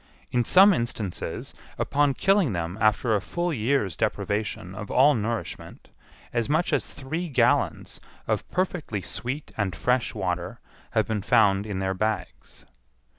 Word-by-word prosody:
In 120 Hz, -1 st, +2 dB
some 195 Hz, -, +7 dB
instances, 115 Hz, -, -4 dB, 0.2 s
upon 145 Hz, -1 st, +1 dB
killing 195 Hz, -, +3 dB
them 85 Hz, +1 st, -3 dB
after 110 Hz, +2 st, +3 dB
a 100 Hz, -, 0 dB
full 175 Hz, -, -2 dB
year's 115 Hz, -, 0 dB
deprivation 100 Hz, -3 st, -2 dB
of 105 Hz, +1 st, -7 dB
all 140 Hz, +4 st, +5 dB
nourishment, 115 Hz, 0 st, -4 dB, 0.4 s
as 120 Hz, 0 st, 0 dB
much 160 Hz, +2 st, +1 dB
as 140 Hz, -, 0 dB
three 160 Hz, +6 st, -4 dB
gallons 140 Hz, -, +1 dB, 0.2 s
of -, -, -2 dB
perfectly 175 Hz, -, -2 dB
sweet 135 Hz, +5 st, -5 dB
and 100 Hz, -4 st, -1 dB
fresh 125 Hz, +6 st, 0 dB
water 90 Hz, -2 st, -3 dB, 0.4 s
have -, -, +4 dB
been 110 Hz, -2 st, -1 dB
found 100 Hz, -2 st, +3 dB
in 100 Hz, -3 st, -3 dB
their 95 Hz, 0 st, -1 dB
bags. 95 Hz, -, -4 dB
115 Hz, 140 wpm, -26 LUFS, 100-145 Hz, 0.4 s, some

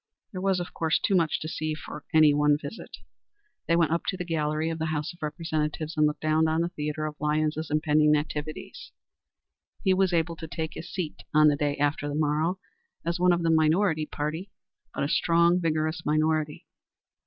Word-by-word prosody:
There 185 Hz, -, -5 dB
was, 190 Hz, -1 st, +1 dB
of 175 Hz, -, -6 dB
course, 160 Hz, -2 st, +1 dB
too -, -, 0 dB
much 170 Hz, -4 st, +2 dB
to 155 Hz, -, -4 dB
see 155 Hz, -1 st, -3 dB
for 150 Hz, 0 st, -9 dB
any 155 Hz, -2 st, +6 dB
one 150 Hz, 0 st, +3 dB
visit. 155 Hz, +9 st, -8 dB, 0.7 s
They 165 Hz, -, +3 dB
went 165 Hz, -2 st, +2 dB
up 170 Hz, -, 0 dB
to 185 Hz, -, -1 dB
the 180 Hz, -, -4 dB
gallery 155 Hz, -1 st, -1 dB
of 165 Hz, -, -5 dB
the 160 Hz, -, -1 dB
House 150 Hz, 0 st, -2 dB
of 175 Hz, -, -21 dB
Representatives 155 Hz, 0 st, -3 dB
and 150 Hz, 0 st, +4 dB
looked 150 Hz, -, -4 dB
down 155 Hz, +1 st, +2 dB
on 160 Hz, +1 st, +1 dB
the 170 Hz, -, 0 dB
theatre 150 Hz, -1 st, -3 dB
of 150 Hz, -1 st, -5 dB
Lyons's 155 Hz, +1 st, 0 dB
impending 150 Hz, 0 st, +3 dB
activities. 150 Hz, +1 st, -5 dB, 0.9 s
He 190 Hz, -3 st, +4 dB
was 190 Hz, 0 st, +3 dB
to 165 Hz, -1 st, -1 dB
take 160 Hz, -1 st, -4 dB
his 175 Hz, +2 st, -8 dB
seat 180 Hz, -5 st, -4 dB
on 155 Hz, 0 st, +7 dB
the 145 Hz, -, +2 dB
day 145 Hz, 0 st, -1 dB
after 145 Hz, 0 st, 0 dB
the 145 Hz, -, -3 dB
morrow 155 Hz, +4 st, +1 dB, 0.5 s
as 170 Hz, +1 st, -1 dB
one 180 Hz, 0 st, +4 dB
of 175 Hz, -1 st, +1 dB
the 165 Hz, -, +3 dB
minority 160 Hz, 0 st, +2 dB
party, 160 Hz, +6 st, -4 dB, 0.4 s
but -, -, -3 dB
a -, -, +1 dB
strong, 170 Hz, +3 st, +3 dB
vigorous 160 Hz, 0 st, -1 dB
minority. 155 Hz, 0 st, 0 dB
155 Hz, 195 wpm, -27 LUFS, 150-170 Hz, 0.9 s, on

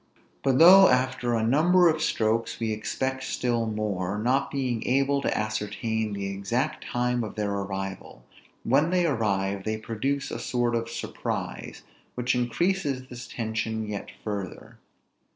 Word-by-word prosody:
But 135 Hz, -2 st, +2 dB
though 190 Hz, +4 st, +9 dB
after 125 Hz, -1 st, +1 dB
a 110 Hz, -, 0 dB
number 175 Hz, +8 st, +5 dB
of 155 Hz, -1 st, +1 dB
strokes, 115 Hz, -5 st, 0 dB
we 115 Hz, -1 st, -1 dB
expect 130 Hz, +5 st, -2 dB
still 120 Hz, -3 st, -1 dB
more, 105 Hz, -3 st, -2 dB
not 125 Hz, +6 st, +1 dB
being 125 Hz, -5 st, -2 dB
able 140 Hz, +2 st, +2 dB
to -, -, 0 dB
ascertain 110 Hz, +1 st, -2 dB
the 100 Hz, -1 st, -3 dB
exact 100 Hz, +9 st, -2 dB
time 125 Hz, 0 st, -1 dB
of 110 Hz, -, -6 dB
their 105 Hz, -2 st, -1 dB
arrival, 95 Hz, -10 st, -5 dB, 0.4 s
when 140 Hz, +7 st, +3 dB
they 180 Hz, -1 st, +2 dB
arrive, 100 Hz, -8 st, 0 dB
they 110 Hz, +1 st, -2 dB
produce 130 Hz, +6 st, -2 dB
a -, -, -4 dB
sort 120 Hz, -1 st, 0 dB
of 115 Hz, 0 st, -1 dB
surprise, 115 Hz, -, -5 dB, 0.3 s
which 125 Hz, +1 st, 0 dB
increases 135 Hz, +1 st, -1 dB
this 120 Hz, 0 st, -8 dB
tension 110 Hz, -1 st, -3 dB
yet 105 Hz, -1 st, -5 dB
further. 100 Hz, -4 st, -6 dB
115 Hz, 145 wpm, -26 LUFS, 105-130 Hz, 0.4 s, though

